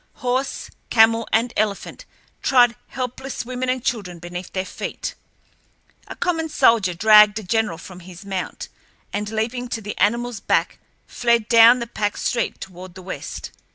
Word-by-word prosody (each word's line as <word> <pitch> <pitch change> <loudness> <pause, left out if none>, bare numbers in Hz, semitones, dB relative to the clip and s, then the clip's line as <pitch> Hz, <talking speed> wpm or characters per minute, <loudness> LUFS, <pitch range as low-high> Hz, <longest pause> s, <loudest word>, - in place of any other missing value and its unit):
Horse, 255 +2 -2 0.2
camel, 225 0 +4
and 230 +2 +1
elephant 210 -2 -2 0.4
trod 245 -3 +4
helpless 255 0 -5
women 255 +1 -3
and 255 -1 -2
children 195 -7 -2
beneath 175 +1 -8
their 185 0 -2
feet. - - -5 0.9
A - - -8
common 325 -3 -1
soldier 210 - +3
dragged 210 +2 +6
a 215 - -4
general 210 -2 0
from 180 +1 -11
his 180 +1 -12
mount, 190 -2 -4 0.5
and, 210 +1 -2
leaping 230 +3 -2
to 235 - -3
the 210 -1 -6
animal's 235 +1 +1
back, - - 0 0.3
fled 235 -3 +1
down 230 +2 +7
the 235 - -4
packed 205 -3 -3
street 235 -2 -1
toward 185 0 -10
the 185 - -10
west. 185 - -7
220 Hz, 155 wpm, -22 LUFS, 195-245 Hz, 0.9 s, down